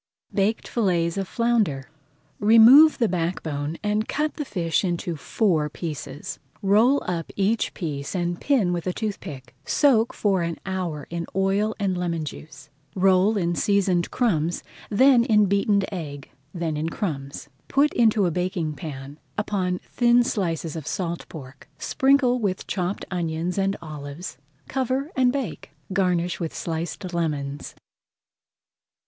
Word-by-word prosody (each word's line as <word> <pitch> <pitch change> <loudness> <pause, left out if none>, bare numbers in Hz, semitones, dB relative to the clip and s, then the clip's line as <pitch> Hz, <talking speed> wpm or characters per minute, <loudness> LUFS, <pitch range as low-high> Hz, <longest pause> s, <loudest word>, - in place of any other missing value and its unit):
BAKED 210 +2 0
FILLETS 175 -7 +1
OF 195 -1 -2
FLOUNDER 215 - 0 0.5
Remove 230 +9 +8
the 235 - +2
back 175 -1 -2
bone 150 +1 -3
and 210 +1 0
cut 300 +1 -1
the 295 - -4
fish 170 - 0
into 175 -2 -2
four 160 -2 0
pieces. 150 -3 -6 0.2
Roll 220 +8 +4
up 170 -2 -3
each 205 +3 0
piece 145 -3 -4
and 175 -1 -2
pin 230 -11 +2
with 175 0 -3
a 180 - 0
toothpick. 150 - -6
Soak 245 -6 +3
for 195 -3 +1
an 170 -1 -2
hour 180 -6 -3
in 170 -1 -3
oil 195 +3 +1
and 195 -2 0
lemon 170 -3 -2
juice. 150 -1 -10 0.2
Roll 190 +3 +4
in 175 -3 0
seasoned 185 -1 +1
crumbs, 175 -9 0 0.3
then 255 +3 +5
in 215 -4 +4
beaten 200 +1 +2
egg, 145 -6 -6 0.2
then 165 -2 -3
in 155 +2 -1
crumbs. 145 -9 -4 0.2
Put 285 +2 +2
into 220 -4 +3
a 175 - +1
baking 180 -2 -2
pan, 145 -2 -8 0.2
upon 190 -3 -1
thin 240 0 +3
slices 170 - -2
of 160 -4 -6
salt 170 -2 -3
pork, 135 -3 -11
sprinkle 265 - +2
with 195 -5 -2
chopped 185 +1 -2
onion 170 -1 -2
and 195 0 +1
olives, 145 -1 -7 0.3
cover, 265 +3 -1
and 255 -1 +4
bake. 270 -3 -4 0.2
Garnish 180 -2 +1
with 165 -3 -4
sliced 170 +2 -4
lemons. 145 -4 -3
180 Hz, 140 wpm, -24 LUFS, 165-215 Hz, 0.5 s, Remove